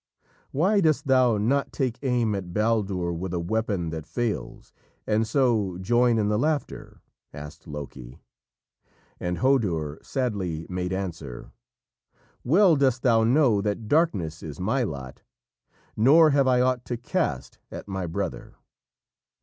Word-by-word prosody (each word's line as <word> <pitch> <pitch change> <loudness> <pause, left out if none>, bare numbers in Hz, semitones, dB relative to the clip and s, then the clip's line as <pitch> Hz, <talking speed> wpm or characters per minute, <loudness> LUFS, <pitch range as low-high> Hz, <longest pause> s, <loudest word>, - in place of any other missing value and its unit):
"Why 195 +8 +2
dost 155 -4 +2
thou 130 -4 +4
not 130 +7 0
take 130 -4 -2
aim 120 -5 +1
at 90 -3 -5
Baldur 100 -5 0
with 90 +1 -4
a - - -1
weapon 95 -2 -2
that 80 -2 -6
fails 120 -3 -4 0.3
and 110 +1 +1
so 110 -9 +1
join 120 +5 +2
in 105 -2 +1
the 105 0 +1
laughter?" 150 +2 -3 0.3
asked 75 +4 -10
Loki. 70 -4 -8 1.0
And 90 0 -2
Hodur 90 - 0
sadly 95 - -3
made 90 0 -3
answer: 80 -9 -5 0.9
"Well 175 +5 +5
dost 130 -3 +1
thou 115 -3 +4
know 120 -3 +3
that 105 +1 -3
darkness 100 - +1
is 75 0 -8
my 110 +9 0
lot, 70 - -5 0.7
nor 150 +8 +6
have 140 -1 +3
I 125 -1 +4
ought 125 -1 +1
to 120 - -3
cast - - -3
at - - -8
my 95 -2 -3
brother." 95 +2 -5
110 Hz, 135 wpm, -25 LUFS, 90-130 Hz, 1.0 s, nor